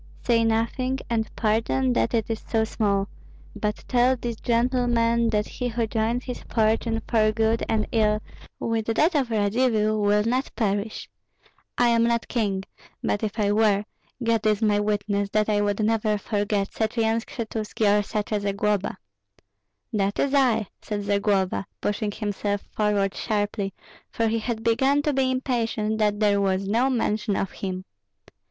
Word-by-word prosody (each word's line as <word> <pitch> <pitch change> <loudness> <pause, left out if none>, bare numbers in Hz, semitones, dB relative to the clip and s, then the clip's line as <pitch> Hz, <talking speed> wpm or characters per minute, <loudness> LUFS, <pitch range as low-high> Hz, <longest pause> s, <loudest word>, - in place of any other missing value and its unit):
"Say 230 -2 +3
nothing, 230 +4 0
and 220 -1 0
pardon 135 - +1
that 115 - +1
it 225 - 0
is 225 -1 -2
so 225 -1 +1
small; 200 -3 0 0.5
but 210 0 -3
tell 250 +1 +3
these 235 -2 -4
gentlemen 235 -1 +2
that 210 -1 0
he 250 - -4
who 235 -1 -1
joins 225 +3 -1
his 250 - -6
fortune 225 0 +1
for 215 -2 +3
good 225 +1 +1
and 220 -1 +1
ill 215 -3 +2 0.4
with 225 -1 -1
that 305 +10 +2
of 275 -5 +1
Radzivill 215 0 +1
will 205 0 +3
not 250 +4 0
perish. 205 -1 -1 0.7
I 245 -1 +4
am 230 0 +3
not 235 0 0
king; 200 -5 -1 0.4
but 205 - 0
if 215 0 -3
I 205 -2 +2
were, 210 -1 +3 0.4
God 230 -2 +1
is 215 +1 +2
my 205 -1 +3
witness 205 -1 0
that 215 0 +2
I 205 -1 +2
would 205 0 0
never 215 -1 +1
forget 205 -1 -1
such 220 +2 -2
a - - +3
Yan 225 +1 +2
Skshetuski 215 -3 0
or - - +2
such 210 +1 -3
a 210 - +1
Zagloba." 200 0 -1 1.0
"That 200 -1 0
is 280 - +1
I!" 250 -6 +3 0.2
said 205 -2 -4
Zagloba, 200 -1 0
pushing 205 0 -1
himself 205 -1 -2
forward 205 -2 +1
sharply, 205 -2 -2 0.4
for 230 - 0
he 225 +1 0
had 225 0 -3
begun 265 +5 +2
to 295 - +1
be 265 -1 +2
impatient 230 -4 -1
that 210 -1 +1
there 205 -2 +3
was 195 0 0
no 235 +6 +2
mention 215 -4 0
of 195 - -2
him. 185 -1 -5
220 Hz, 165 wpm, -25 LUFS, 205-230 Hz, 1.0 s, I